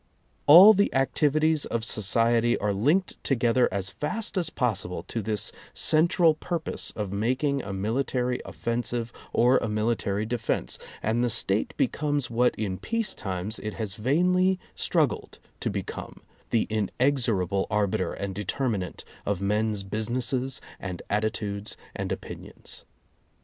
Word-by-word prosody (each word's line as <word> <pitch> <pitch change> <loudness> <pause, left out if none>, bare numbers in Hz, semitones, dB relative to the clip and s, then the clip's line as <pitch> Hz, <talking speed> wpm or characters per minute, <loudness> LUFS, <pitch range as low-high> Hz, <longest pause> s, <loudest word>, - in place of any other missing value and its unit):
All 180 +9 +11
the 200 0 +2
activities 150 +4 +2
of 115 -1 -2
so 110 - -1
ciety 115 +3 +3
are 105 0 0
linked 150 - +1
together 120 -1 +2
as 95 0 -2
fast 215 +10 -3
as 175 -4 0
possible 95 - -2
to 115 +5 -4
this 105 0 0 0.2
central 165 +1 +4
purpose 165 +1 -3
of 105 -3 -3
making 130 +7 0
a 100 - -6
military 125 +5 -1
offensive 120 0 -3 0.2
or 125 +2 +4
a - - -2
military 105 -1 0
defense, 115 0 -1 0.2
and 115 +3 +1
the 120 - +2
State 110 -2 +1
becomes 145 -2 0
what 125 +2 +2
in 95 -4 -3
peace 230 -3 -1
times 95 +3 -4
it 105 0 -5
has 110 -4 -3
vainly 180 - +2 0.2
struggled - - 0 0.2
to - - -1
become - - -6
— - - -33
the 115 - +2
inexorable 110 -4 +1
arbiter 100 -4 0
and 100 -1 -4
determinant 105 -1 -2 0.2
of 100 -2 -1
men's 105 +1 0
businesses 120 +5 -1 0.2
and 90 -3 -6
attitudes 105 -1 -1 0.2
and - - -3
opinions. - - -7
115 Hz, 135 wpm, -26 LUFS, 105-135 Hz, 0.2 s, All